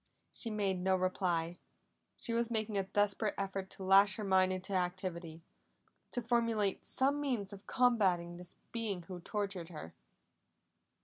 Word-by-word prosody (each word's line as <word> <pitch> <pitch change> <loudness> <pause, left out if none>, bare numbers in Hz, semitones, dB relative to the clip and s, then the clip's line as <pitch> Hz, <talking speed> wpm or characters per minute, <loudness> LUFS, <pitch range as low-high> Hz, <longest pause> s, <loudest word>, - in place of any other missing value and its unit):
She 230 - 0
made 200 -4 0
no 190 +1 +2
reply; 175 -2 0 0.6
she 230 - -2
was 235 0 +1
making 220 -2 -1
a 195 - +3
desperate 205 +2 +1
effort 195 -1 -3
to 190 - -7
lash 195 +1 +6
her 215 - -4
mind 190 -1 +4
into 185 +1 -3
activity, 180 -3 -3 0.7
to 245 - -2
formulate 230 -4 +1
some 280 +2 +1
means 230 -8 -2
of 195 -1 -12
combating 190 -9 +2
the 180 0 -8 0.2
being 215 -6 -3
who 180 0 -7
tortured 195 -2 -3
her. 150 - -8
195 Hz, 145 wpm, -34 LUFS, 180-215 Hz, 0.7 s, lash